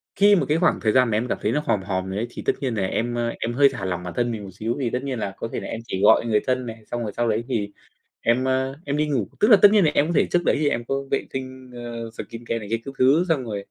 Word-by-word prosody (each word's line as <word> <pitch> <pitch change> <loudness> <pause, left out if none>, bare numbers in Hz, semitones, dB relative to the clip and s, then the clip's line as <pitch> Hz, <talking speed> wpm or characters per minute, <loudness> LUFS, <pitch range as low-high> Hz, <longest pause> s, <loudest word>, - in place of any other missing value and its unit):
khi 205 +1 +6
mà 185 - +1
cái 155 - +3
khoảng 175 +1 +2
thời 110 - +1
gian 125 0 +4
mà 105 - +2
em 120 +3 -1
cảm - - -1
thấy 105 - 0
nó 150 - +1
hòm 100 - +1
hòm 95 -1 -2
rồi 95 - -4
ấy, 115 +3 -2
thì - - -8
tất - - +3
nhiên 130 -4 -1
là 100 - -1
em, 120 +4 -2
ơ, 120 0 -1
em 120 - -2
hơi 140 +2 +5
thả 110 -7 -5
lỏng 90 -1 -3
bản 90 - -6
thân 120 -1 0
mình 105 -3 -5
một 95 - -8
xíu 110 +5 -3
thì 125 -4 0
tất 125 +3 -3
nhiên 130 -4 -3
là 100 -2 -3
có - - -4
thể - - -2
là - - -7
em 115 - -5
chỉ 95 - -3
gọi 105 - +6
người 110 -2 +2
thân 130 -1 0
này, 115 -1 -8
xong 120 -1 -2
rồi 105 - -3
sau 120 0 +1
đấy 110 +2 0
thì 105 -6 -2 0.5
em, 120 +2 +2
ơ, 130 +1 0
em 145 0 -2
đi 150 0 +1
ngủ. 125 -9 -1
Tức 210 - +4
là 215 - +9
tất 205 - +11
nhiên 205 -4 +5
là 150 - +4
em 145 - +3
có 170 - -2
thể - - +4
trước 175 - +3
đấy - - +3
thì 150 - +3
em 120 -4 -2
có 135 - -2 0.2
vệ - - 0
tinh, 130 -1 -7
ờ, 115 -1 -6
skincare 115 0 -5
này 105 -2 -9
kia 115 - +2
các 135 - -7
thứ 140 +7 +4
xong 150 -6 +1
rồi 110 -3 -4
120 Hz, 335 wpm, -23 LUFS, 110-135 Hz, 0.5 s, tất